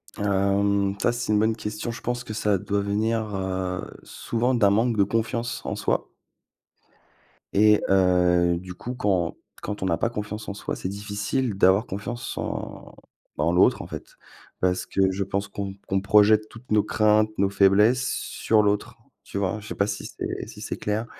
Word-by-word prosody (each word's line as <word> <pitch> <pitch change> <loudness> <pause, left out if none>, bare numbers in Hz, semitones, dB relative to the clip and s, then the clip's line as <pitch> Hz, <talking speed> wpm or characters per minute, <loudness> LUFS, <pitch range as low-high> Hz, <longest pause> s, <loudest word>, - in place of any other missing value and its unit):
Hem, 100 0 +1
ça, - - +3
c'est 120 -2 -3
une 105 - +4
bonne 110 +1 +2
question, 105 +1 -4
je 115 - -8
pense 120 0 -2
que 110 - -7
ça 105 -2 +1
doit 100 +2 -1
venir, 110 +3 0
heu, 95 -1 -2 0.2
souvent 120 +2 -1
d'un 105 -4 +4
manque 115 +2 +2
de 100 - +5
confiance 115 +3 -2
en - - -2
soi. - - -1 1.4
Et 105 +1 +5
heu, 90 -2 +3
du 90 +1 -8
coup, 120 +7 -6
quand 95 -7 0 0.2
quand 105 0 -5
on - - -1
n'a 85 -3 +1
pas 115 - 0
confiance 105 -1 -5
en - - -3
soi, 100 - -4
c'est 90 - -4
difficile 105 +3 -2
d'avoir 95 +4 +4
confiance 120 +4 -5
en - - -5 0.4
en 75 +3 +2
l'autre, 90 - +4
en - - -9
fait. - - -9 0.4
Parce 90 0 0
que 95 -1 +1
je 95 +1 -2
pense 100 +1 -2
qu'on 100 0 -5
qu'on 95 -1 0
projette 105 +2 +4
toutes 115 +1 -14
nos 105 -1 +4
craintes, 110 0 +3
nos 100 0 +2
faiblesses 105 +6 +4
sur 110 -4 +1
l'autre. 105 0 -1 0.3
Tu - - -7
vois? 100 +2 -1
Je 105 - -11
sais - - -5
pas 100 - +1
si 100 - -4
c'est - - -5
si - - -11
c'est - - -4
clair 105 +2 -2
105 Hz, 185 wpm, -25 LUFS, 95-110 Hz, 1.4 s, de